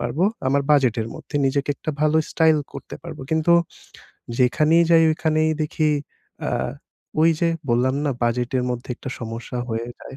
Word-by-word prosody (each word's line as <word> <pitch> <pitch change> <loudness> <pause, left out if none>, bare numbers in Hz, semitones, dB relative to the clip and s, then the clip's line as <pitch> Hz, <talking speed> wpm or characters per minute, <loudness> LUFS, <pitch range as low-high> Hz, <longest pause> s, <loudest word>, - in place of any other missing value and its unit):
পারবো। 120 +8 -2 0.3
আমার 140 +1 +2
বাজেটের 120 -6 +3
মধ্যে 145 - -6
নিজেকে 140 +1 0
একটা 155 - -4
ভালো 155 +1 +3
স্টাইল 160 -2 +4
করতে - - -8
পারবো। - - -8
কিন্তু 160 +2 +3 0.9
যেখানেই 155 +6 +4
যাই, 165 -1 +7
ঐখানেই 155 0 +1
দেখি 155 0 0 0.5
অ্যা - - -2 0.7
ওইযে 165 +1 +3 0.2
বললাম 125 +2 +2
না, 145 - +1
বাজেটের 125 +2 0
মধ্যে 120 0 -5
একটা - - -8
সমস্যা 115 +2 -5
হয়ে 115 +1 -2
যায়। 135 - -10
140 Hz, 150 wpm, -22 LUFS, 125-155 Hz, 0.9 s, যাই